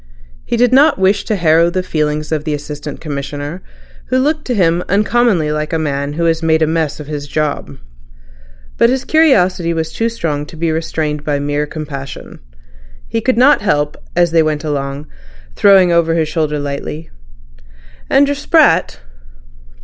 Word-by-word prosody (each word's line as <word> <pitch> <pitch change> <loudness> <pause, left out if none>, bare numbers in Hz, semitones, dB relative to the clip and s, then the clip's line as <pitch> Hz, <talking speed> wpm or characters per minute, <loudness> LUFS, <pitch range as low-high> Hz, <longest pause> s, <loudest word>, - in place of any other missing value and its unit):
He - - -1
did 245 +1 +3
not 285 +3 +5
wish 190 +2 +1
to 215 - -1
harrow 165 -2 +3
the 185 +1 -2
feelings 150 -3 -2
of 155 -2 -1
the 155 -1 -2
Assistant 145 0 -7
Commissioner, 145 +2 -5 0.5
who 255 - +1
looked 300 +4 0
to 250 - -1
him 175 -3 +2
uncommonly 205 -5 +2
like 150 +1 -3
a - - +2
man 140 -2 -2
who 170 +2 -1
has 165 0 +1
made 160 -1 +2
a - - +4
mess 160 -2 -1
of 150 - -7
his 145 -1 -6
job. 145 - -3 1.0
But 235 - +5
his 260 +1 -1
curiosity 185 - +2
was 160 -1 -3
too 230 +1 0
strong 150 -10 -3
to 165 - -12
be 165 0 -1
restrained 155 -2 -3
by 150 -1 -1
mere 145 +1 -2
compassion. 140 -4 -8 0.7
He 225 - -2
could 255 +1 0
not 265 +2 +5
help, 150 -7 0 0.2
as 175 -1 +2
they 165 -1 +4
went 155 -1 -1
along, 140 -1 -3
to - - -25 0.5
throw 200 -1 +6
over 165 -1 +2
his 160 -2 +1
shoulder 155 -2 -1
lightly: 145 +2 -5 1.0
"And 280 +1 +4
your 285 - 0
sprat?" 290 - +2
160 Hz, 170 wpm, -15 LUFS, 150-195 Hz, 1.0 s, throw